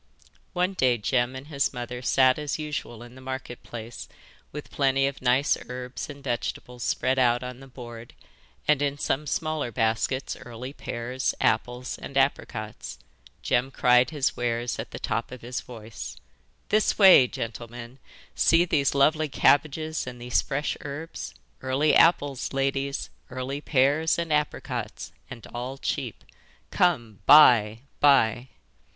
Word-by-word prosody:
One 180 +1 0
day 130 -9 +2
Jem 120 +3 0
and 130 +1 -8
his 140 -3 -1
mother 125 0 -6
sat 130 +1 +3
as 150 -1 -3
usual 150 -6 -5
in 120 0 -13
the 130 - -13
Market 130 -2 -6
Place 115 0 -8 0.4
with 150 0 -8
plenty 135 -1 +2
of 140 0 -3
nice 130 +3 +3
herbs 125 +2 -6
and 140 -1 -10
vegetables 125 -1 -4
spread 130 +2 0
out 120 -1 +3
on 125 0 -7
the 135 - -12
board, 120 -3 -11 0.5
and 150 -2 +3
in 145 0 0
some 145 +1 -1
smaller 155 -1 -2
baskets 115 +4 -1
early 125 +3 -8
pears, 125 0 -3
apples, 125 +3 -1
and 140 - -6
apricots. 120 -5 -2 0.5
Jem 125 +2 +1
cried 125 -1 +4
his 150 -4 -1
wares 120 0 -2
at - - -5
the - - -7
top - - -3
of 125 - -9
his 125 +1 -4
voice: 110 - -9 0.5
'This 215 0 +2
way, 190 -11 +8
gentlemen! 120 +2 -7 0.3
See 165 +1 +4
these 140 -5 +1
lovely 155 +2 +3
cabbages 155 +2 +1
and 125 -1 -7
these 120 0 +1
fresh 145 +1 -2
herbs! 155 +1 -7 0.3
Early 135 +4 +2
apples, 145 -6 +3
ladies; 135 0 -1 0.2
early 130 +3 -4
pears 145 +3 +2
and 170 -2 -1
apricots, 125 -6 -3 0.2
and 125 -4 -9
all 125 +3 -5
cheap. 130 -6 -4 0.5
Come, 120 - +1
buy, 115 -7 +7 0.2
buy! 130 -4 +4
130 Hz, 145 wpm, -26 LUFS, 120-145 Hz, 0.5 s, way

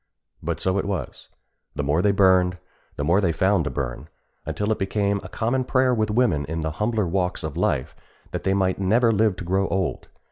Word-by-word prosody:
But 80 0 -3
so 95 +1 +1
it - - -2
was. 95 -8 -5 0.5
The 75 - -2
more 75 +5 +1
they 105 - +3
burned, 95 -2 +4 0.4
the 70 - -3
more 85 +7 +3
they 90 -4 +2
found 95 0 +2
to - - -1
burn, 70 +1 -5 0.4
until 105 +1 -1
it 110 - 0
became 100 +1 0
a 95 - -10
common 120 +5 0
prayer 130 0 +2
with 110 -2 0
women 105 -10 +2
in 80 +3 -4
the 80 0 -2
humbler 105 +4 0
walks 90 +1 -1
of 75 -1 -4
life, 75 -6 -1 0.4
that - - -4
they 95 +1 +1
might 95 -1 +1
never 115 +5 +3
live 110 -2 +2
to - - -7
grow 95 +3 +1
old. 95 -2 -2
95 Hz, 210 wpm, -24 LUFS, 85-105 Hz, 0.5 s, burned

